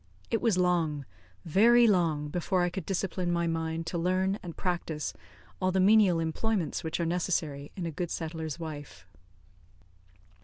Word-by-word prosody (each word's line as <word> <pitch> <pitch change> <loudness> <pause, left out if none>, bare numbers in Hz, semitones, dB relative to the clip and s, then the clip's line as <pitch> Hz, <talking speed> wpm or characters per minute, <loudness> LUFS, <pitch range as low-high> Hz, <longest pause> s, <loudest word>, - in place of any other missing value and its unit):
It 225 - +1
was 225 -6 +2
long, 165 -6 +1 0.4
very 235 +8 +6
long, 165 -8 +2
before 180 +3 0
I 175 - 0
could 185 -2 -6
discipline 185 -2 -1
my 170 0 +1
mind 165 0 -2
to 170 +1 -2
learn 185 +3 +1
and 170 -3 -8
practice 170 -4 -2 0.5
all 185 0 +2
the 190 - +1
menial 195 -3 +5
employments 170 +3 -1
which 160 +1 -3
are 170 - +1
necessary 165 -5 -1
in 185 -4 -4
a 165 - -3
good 175 +3 -3
settler's 160 -2 -4
wife. 155 -3 -8
175 Hz, 155 wpm, -29 LUFS, 160-185 Hz, 0.5 s, very